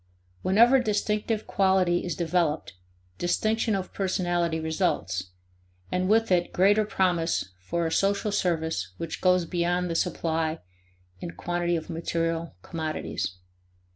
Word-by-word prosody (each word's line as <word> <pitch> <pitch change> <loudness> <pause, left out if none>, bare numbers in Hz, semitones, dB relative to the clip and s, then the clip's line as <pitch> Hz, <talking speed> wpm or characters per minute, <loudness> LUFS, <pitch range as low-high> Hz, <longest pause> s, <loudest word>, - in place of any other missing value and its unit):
Whenever 235 +7 +5
distinctive 210 -1 0
quality 190 -3 +2
is 175 -4 -3
developed, 165 -2 0 0.5
distinction 215 +5 +1
of 190 -1 -4
personality 175 -4 0
results, 160 - -1 0.7
and 185 +1 0
with 225 0 +3
it 175 -1 +2
greater 205 +3 +4
promise 175 - 0
for 170 - -2
a 160 - -1
social 200 +4 +1
service 160 - -1
which 165 -1 -5
goes 180 -1 +4
beyond 175 +1 0
the - - -2
supply 160 -1 0 0.6
in - - -5
quantity 175 - -1
of 160 - -4
material 165 0 -2
commodities. 155 - -3
175 Hz, 120 wpm, -27 LUFS, 165-195 Hz, 0.7 s, Whenever